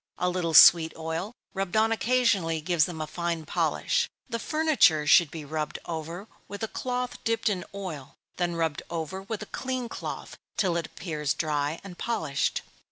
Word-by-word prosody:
A 180 0 +1
little 170 -3 -1
sweet 160 0 +9
oil, 160 +5 -3 0.2
rubbed 195 +1 -1
on 220 +1 +4
occasionally, 225 -9 +2
gives 165 -1 +2
them 165 -3 -6
a - - -1
fine 170 0 -3
polish. 475 - 0 0.2
The 230 -3 -3
furniture 305 - +3
should 160 +2 +6
be 155 0 -7
rubbed 150 +1 -3
over 170 +4 -5 0.2
with 205 +2 -7
a - - 0
cloth 250 +2 -3
dipped 230 -1 +1
in 185 -4 -2
oil, 170 -9 -6 0.2
then 175 -1 0
rubbed 160 -3 -1
over 170 +3 -4
with 210 +2 -5
a - - -15
clean 255 -2 -2
cloth - - -6 0.2
till 185 -5 +2
it 170 -2 -1
appears 150 -5 -3
dry 150 0 -1
and 185 -3 -10
polished. 160 -12 -1
175 Hz, 170 wpm, -27 LUFS, 160-220 Hz, 0.2 s, sweet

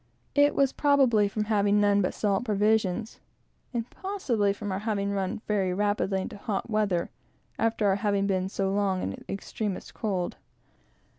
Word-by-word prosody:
It 290 0 +4
was 275 -1 +3
probably 265 -8 +4
from 210 +1 -2
having 205 -1 +2
none 205 0 +4
but 185 - -1
salt 200 0 +1
provisions, 215 -1 +1 0.5
and 235 -2 -2
possibly 265 - 0
from 205 0 -4
our 190 - -1
having 200 -2 -1
run 195 +1 -2
very 195 -4 +1
rapidly 205 -1 0
into 205 +2 -6
hot 210 +1 -3
weather, 205 -5 0 0.5
after 220 -3 +2
having 200 -2 +1
been 190 -1 0
so 195 -1 -1
long 195 -2 0
in - - -2
the - - -9
extremest 200 0 -4
cold. 190 -6 -2
205 Hz, 155 wpm, -27 LUFS, 195-220 Hz, 0.5 s, It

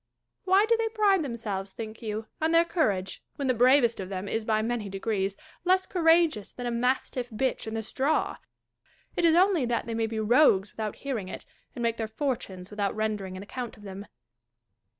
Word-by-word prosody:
Why 385 +2 +5
do 465 - +4
they 455 0 0
pride 410 -5 +3
them 240 -5 -4
selves, 200 -4 -4
think 220 -1 -7
you, 215 -1 -4 0.2
on 320 +1 +2
their 335 +1 +6
courage, 205 - -1
when 280 - -2
the 255 - +3
bravest 245 -1 +4
of 190 -1 -5
them 190 0 -4
is 225 +2 -1
by 215 0 +1
many 225 -3 -2
degrees 195 0 -2 0.3
less 370 +1 +3
courageous 325 - +3
than 245 - -7
a 240 - -1
mastifi" 250 +1 0
bitch 260 -2 -1
in 220 - -4
the 220 - -2
straw? 270 +7 0 0.8
It 350 - +2
is 330 -1 +5
only 365 -4 +4
that 235 -1 0
they 230 - -4
may 225 0 0
be 220 0 -3
rogues 215 -3 +4
without 215 -2 -4
hearing 235 -9 -4
it, - - -7 0.3
and 240 - -4
make 230 0 +1
their 225 - -2
fortunes 220 -7 -4
without 205 -1 -1
render 215 -2 -1
ing 185 0 -7
an 190 - -7
account 240 +3 -6
of 210 - -16
them. 200 +1 -8
230 Hz, 205 wpm, -28 LUFS, 210-290 Hz, 0.8 s, their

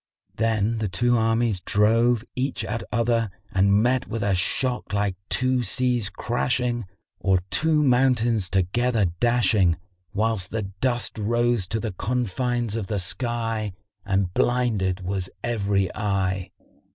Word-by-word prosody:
Then 110 0 0
the 110 - -1
two 120 +6 +1
armies 115 -2 +1
drove 115 +4 +2
each 130 +2 -2
at 115 - -3
other 115 -2 +1 0.2
and 100 +2 +3
met 125 +1 +1
with 115 -2 -3
a 100 -1 +2
shock 125 +7 -1
like 100 -2 0
two 130 0 +1
seas 120 -1 0
crashing 120 -1 -1 0.3
or 95 -2 +2
two 155 -1 +3
mountains 120 -6 +2
together 110 +4 +1
dashing, 105 -7 +3 0.3
whilst 105 -3 0
the 110 -1 -2
dust 110 +5 -2
rose 120 -1 +1
to 110 - -1
the 110 -1 -3
confines 120 +2 -1
of 110 -4 -3
the 105 - -2
sky 115 +1 -2 0.3
and 95 -3 0
blinded 110 -7 +1
was 95 0 -2
every 100 -5 0
eye. 95 -3 -1
115 Hz, 130 wpm, -24 LUFS, 100-120 Hz, 0.3 s, and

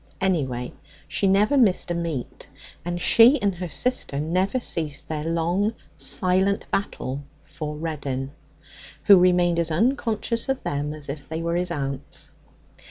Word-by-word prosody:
Anyway, 135 -10 -1 0.3
she 200 - 0
never 205 +8 +3
missed 210 -9 +3
a - - +2
meet, 165 -7 -4 0.4
and 175 0 -3
she 235 - +6
and 200 -3 +1
her 180 0 -5
sister 150 - -1
never 185 - 0
ceased 155 - -3
their 155 -1 -3
long 175 +6 0 0.2
silent 190 +2 +1
battle 140 -8 -2 0.2
for 150 -1 -6
Reddin, 140 -4 -4 0.7
who 200 -3 +8
remained 175 -1 +3
as 165 -1 +1
unconscious 230 - 0
of 270 0 -1
them 145 +1 -2
as 150 -1 -7
if 140 0 -7
they 160 +1 -3
were 170 0 -1
his 180 +1 0
aunts. 135 -1 -4
170 Hz, 145 wpm, -24 LUFS, 150-200 Hz, 0.7 s, who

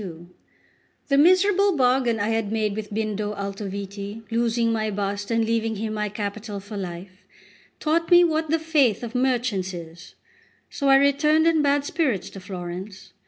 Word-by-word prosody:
LXXXII 175 -3 -9 0.8
THE 275 - +3
MISERABLE 375 +3 +4
bargain 250 -3 +2
I 205 +2 0
had 225 -2 -1
made 215 -2 -1
with 215 -1 -6
Bindo 210 -1 -2
Altoviti, 200 +1 -6
losing 230 0 +1
my 220 -1 -1
bust 200 0 -3
and 230 -1 +1
leaving 225 0 0
him 215 +1 -3
my 210 -1 -2
capital 205 0 -5
for 205 +2 -10
life, 185 0 -8 0.5
taught 330 +2 0
me 350 -1 +7
what 315 -2 0
the 325 - +3
faith 300 -9 +1
of 235 -1 -6
merchants 245 -7 0
is; 165 0 -11 0.6
so 280 -2 -1
I 270 - +7
returned 290 +3 +3
in 330 -2 +3
bad 285 0 +2
spirits 285 - -1
to 195 - -9
Florence. 185 +1 -8
220 Hz, 165 wpm, -24 LUFS, 200-275 Hz, 0.8 s, me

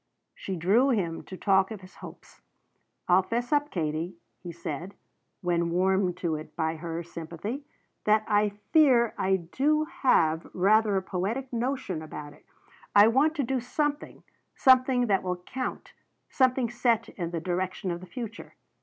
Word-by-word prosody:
She 190 - -5
drew 200 +11 +3
him 180 -9 0
to 185 - -9
talk 190 -1 +3
of 215 -3 -7
his 185 0 -15
hopes. - - -13 0.7
"I'll 180 +1 +5
fess 240 +8 -2
up, 290 0 +2
Katie," 165 - -3 0.2
he 175 - -8
said, 170 +2 -6 0.5
when 170 -1 0
warmed 185 +1 +1
to 160 -2 0
it 155 - -11
by 160 -1 -1
her 165 +1 -5
sympathy, 170 - -6 0.4
"that 215 0 +3
I 210 0 +3 0.2
fear 255 -8 +5
I 190 0 +1
do 275 - +1
have 165 - +1
rather 210 +2 +3
a 190 - 0
poetic 215 +9 -3
notion 235 - -2
about 150 -2 -8
it. - - -21 0.5
I 205 +2 +8
want 290 +7 +3
to 290 - 0
do 260 +1 -1
something 290 +4 -3 0.3
something 255 -1 +4
that 200 -4 +2
will 180 -1 -2
count, 255 +9 -6 0.4
something 255 -3 +2
set 235 -2 +1
in 170 -3 -5
the 170 -1 -3
direction 185 +2 -2
of 170 - -4
the 185 - -11
future. 225 +2 -8
195 Hz, 160 wpm, -27 LUFS, 175-245 Hz, 0.7 s, I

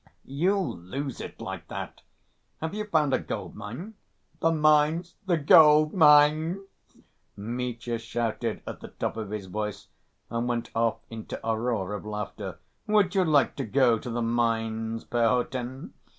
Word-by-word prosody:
"You'll 180 - 0
lose 135 +10 -5
it - - -8
like - - -6
that. - - -7 0.6
Have 160 +2 -4
you 210 0 -3
found 155 -8 +2
a - - +3
gold‐mine?" 120 - -6 0.5
"The 165 - +3
mines? 155 +2 +3
The 175 -3 +3
gold‐mines?" 155 +2 +6 0.7
Mitya 120 +2 -3
shouted 115 -1 -3
at - - -7
the - - -9
top - - -4
of 110 -3 -5
his 105 -2 -5
voice 105 +2 -5 0.4
and 115 +1 -1
went 120 -1 -2
off 115 0 0
into 110 -1 -6
a 115 - +2
roar 110 -4 -2
of 105 - -5
laughter. 105 -3 -5 0.3
"Would 205 -3 +3
you 190 -2 +3
like 155 -4 +3
to 135 - -2
go 120 -1 +3
to 125 - -7
the 120 0 -2
mines, 115 -1 -1
Perhotin? 125 +2 -1
125 Hz, 145 wpm, -27 LUFS, 115-155 Hz, 0.7 s, gold‐mines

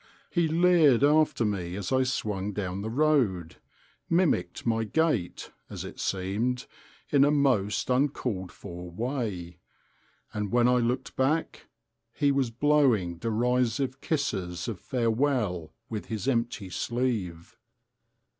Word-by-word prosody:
He 170 -2 +2
leered 160 -6 +4
after 150 -5 +3
me 90 -4 -2
as 100 -2 -4
I 130 0 +3
swung 105 -6 -2
down 95 -1 -3
the 110 - -4
road,—mimicked 140 - -1
my 115 -1 +1
gait, 120 - -1 0.2
as - - -6
it - - -9
seemed, 105 +7 -1 0.5
in 140 -2 +5
a 145 - +5
most 125 -9 +1
uncalled 125 -8 0
for 90 +1 -9
way; 95 - -4 0.7
and 105 -2 -3
when 120 0 +4
I 125 0 +4
looked 120 +2 -2
back, 150 +5 0 0.5
he 145 -2 +2
was 135 -3 +1
blowing 120 - +2
derisive 125 +4 0
kisses 90 - -2
of 110 -6 -4
farewell 115 - 0 0.2
with 110 -3 -5
his 110 +2 -4
empty 115 -6 -1
sleeve. 95 -9 -2
120 Hz, 120 wpm, -28 LUFS, 95-140 Hz, 0.7 s, in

